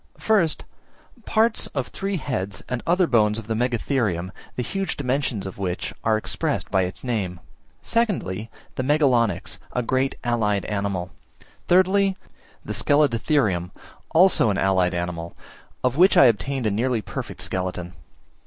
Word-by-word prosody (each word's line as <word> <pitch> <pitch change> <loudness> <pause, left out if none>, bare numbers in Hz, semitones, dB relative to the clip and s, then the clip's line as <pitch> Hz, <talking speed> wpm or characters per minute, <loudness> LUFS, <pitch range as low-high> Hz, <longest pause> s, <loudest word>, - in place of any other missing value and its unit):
First, 195 -8 +1 0.6
parts 220 +1 +2
of 135 -3 -2
three 195 0 -3
heads 105 - -4
and 125 -2 -3
other 180 +2 +4
bones 110 -6 +3
of 115 - -6
the 110 - -2
Megatherium, 115 -6 0 0.2
the 125 - -2
huge 195 - -3
dimensions 130 -6 -1
of 95 0 -7
which 90 -2 -3
are 110 -1 +3
expressed 110 - -2
by 95 - +3
its 90 - -7
name. 100 -8 -2 0.4
Secondly, 115 - -1 0.3
the - - +1
Megalonyx, 120 - +2
a 125 - 0
great 130 +3 0
allied 110 -5 +1
animal. 100 -3 -2 0.6
Thirdly, 190 +2 +4 0.5
the - - -4
Scelidotherium, 115 - +2 0.4
also 175 - +5
an 100 - 0
allied 95 -2 +2
animal, 85 -1 -4 0.5
of 125 +1 +1
which 185 +3 +6
I - - +9
obtained 125 +3 +1
a 105 - +2
nearly 115 +1 0
perfect - - -6
skeleton. 90 -1 -3
115 Hz, 140 wpm, -23 LUFS, 95-145 Hz, 0.6 s, I